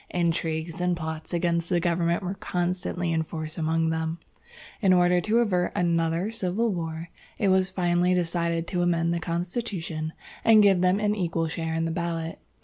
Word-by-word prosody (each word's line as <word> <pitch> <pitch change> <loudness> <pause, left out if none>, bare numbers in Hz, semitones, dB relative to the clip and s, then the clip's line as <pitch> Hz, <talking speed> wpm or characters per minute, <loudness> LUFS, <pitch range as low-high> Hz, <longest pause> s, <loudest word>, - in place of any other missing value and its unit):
Intrigues 165 0 -1
and 180 -1 +1
plots 160 -1 -5
against 170 -1 0
the 175 -2 +2
government 170 +1 +1
were 185 +1 -2
constantly 180 -2 -2
in 160 - +1
force 155 0 -5
among 160 0 +1
them. 160 0 -2 0.6
In 190 -3 +5
order 180 0 +4
to 215 +5 +1
avert 185 -7 +1
another 170 +1 +1
civil 220 +1 0
war, 165 -1 -4 0.3
it 200 - +2
was 190 0 +3
finally 180 -1 +2
decided 170 -1 0
to 180 -2 -1
amend 170 -1 +1
the 170 - -1
constitution, 170 -2 -3 0.3
and 220 -2 +7
give 195 -3 +5
them 185 +2 +3
an 210 0 +1
equal 170 -5 -1
share 160 +1 -3
in 165 0 0
the 165 - -1
ballot. 165 -1 -3
175 Hz, 170 wpm, -26 LUFS, 165-180 Hz, 0.6 s, and